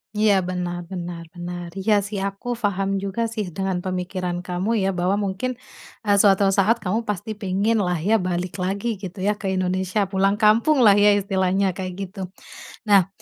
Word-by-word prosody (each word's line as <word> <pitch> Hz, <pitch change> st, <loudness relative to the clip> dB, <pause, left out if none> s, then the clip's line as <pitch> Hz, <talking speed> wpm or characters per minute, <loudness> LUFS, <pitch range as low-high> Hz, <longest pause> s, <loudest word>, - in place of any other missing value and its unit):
Iya, 210 Hz, -3 st, +3 dB
benar 175 Hz, -1 st, -3 dB
benar 175 Hz, -2 st, -5 dB
benar. 175 Hz, -1 st, -6 dB
Iya 205 Hz, +1 st, +2 dB
sih 200 Hz, 0 st, -4 dB
aku 195 Hz, +5 st, -3 dB
paham 195 Hz, -2 st, 0 dB
juga 210 Hz, +4 st, -2 dB
sih 215 Hz, -4 st, -3 dB
dengan 190 Hz, +1 st, -2 dB
pemikiran 180 Hz, -1 st, -3 dB
kamu 185 Hz, +6 st, -1 dB
ya, 195 Hz, -, +2 dB
bahwa 180 Hz, +1 st, 0 dB
mungkin, 205 Hz, +5 st, -2 dB, 0.5 s
e 210 Hz, -, -5 dB
suatu 195 Hz, -1 st, +5 dB
saat 210 Hz, +4 st, +2 dB
kamu 220 Hz, +4 st, -1 dB
pasti 210 Hz, +1 st, -3 dB
pingin 205 Hz, +2 st, 0 dB
lah 180 Hz, -3 st, +1 dB
ya 205 Hz, +7 st, +2 dB
balik 180 Hz, 0 st, -3 dB
lagi 200 Hz, +4 st, -2 dB
gitu 190 Hz, -1 st, -7 dB
ya 205 Hz, +1 st, 0 dB
ke 200 Hz, -, -4 dB
Indonesia, 185 Hz, +2 st, 0 dB
pulang 195 Hz, +1 st, +2 dB
kampung 230 Hz, +6 st, +4 dB
lah 210 Hz, -, +8 dB
ya 205 Hz, 0 st, +6 dB
istilahnya, 190 Hz, -1 st, +1 dB
kayak 185 Hz, 0 st, -5 dB
gitu. 195 Hz, 0 st, -6 dB, 0.6 s
Nah, 200 Hz, -4 st, +5 dB
195 Hz, 175 wpm, -23 LUFS, 185-210 Hz, 0.6 s, lah